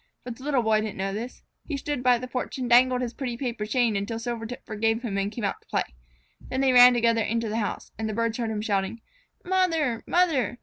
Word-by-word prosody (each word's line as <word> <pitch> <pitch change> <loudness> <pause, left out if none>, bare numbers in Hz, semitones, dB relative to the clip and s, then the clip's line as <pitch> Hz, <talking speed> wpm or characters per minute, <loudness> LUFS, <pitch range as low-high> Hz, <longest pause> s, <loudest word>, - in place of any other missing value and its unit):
But 245 -2 -7
the 260 - -13
Little 275 -5 +1
Boy 220 -1 +3
didn't 215 -1 -5
know 195 +1 -2
this. 235 +5 -6 0.2
He 290 - -4
stood 290 -1 -3
by 250 -1 +4
the 255 +2 -6
porch 250 +1 -4
and 255 -2 -2
dangled 250 +1 +5
his 245 -1 -3
pretty 250 -4 -4
paper 235 -5 -3
chain 235 -1 +1
until 200 +3 -2
Silvertip 230 0 -5
forgave 225 +2 -1
him 215 -5 -3
and 200 +1 -1
came 235 - -6
out 200 - -2
to - - -31
play. - - 0 0.7
Then 260 - -1
they 265 -1 +3
ran 245 0 +9
together 230 -1 +2
into 230 +1 -1
the 215 - -2
house, 205 - -4
and 220 0 -2
the - - -3
birds 230 +1 -1
heard 230 -2 -1
him 215 -1 -2
shouting, 200 +1 -1 0.5
"Mother! 330 -10 +1
Mother! 325 -9 +2
235 Hz, 235 wpm, -26 LUFS, 220-255 Hz, 0.7 s, ran